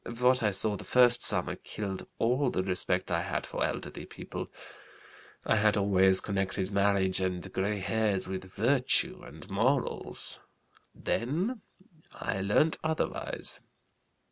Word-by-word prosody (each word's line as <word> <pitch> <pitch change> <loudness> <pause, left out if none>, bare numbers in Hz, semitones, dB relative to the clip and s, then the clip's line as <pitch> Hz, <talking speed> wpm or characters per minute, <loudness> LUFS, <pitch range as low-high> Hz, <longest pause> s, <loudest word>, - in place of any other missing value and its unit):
What 125 +1 +5
I 105 - +3
saw 105 +2 +4
the - - -9
first 125 -1 +5
summer - - 0
killed 100 -3 -6
all 125 +4 +2
the 95 - -1
respect 90 -1 -1
I - - +1
had - - -3
for - - -3
elderly - - -4
people. - - -7 0.9
I 110 - +3
had 105 0 +3
always 95 -1 +4
connected 95 -1 -2
marriage 100 -2 +2
and 95 0 -3
gray 100 +2 0
hairs 100 -1 0
with 95 0 -5
virtue 140 - +2
and 175 - -12
morals; 125 +7 -1 0.6
then 180 - -2 0.5
I 95 - -3
learnt 105 +11 +2
otherwise. 160 0 -2
105 Hz, 130 wpm, -30 LUFS, 95-125 Hz, 0.9 s, What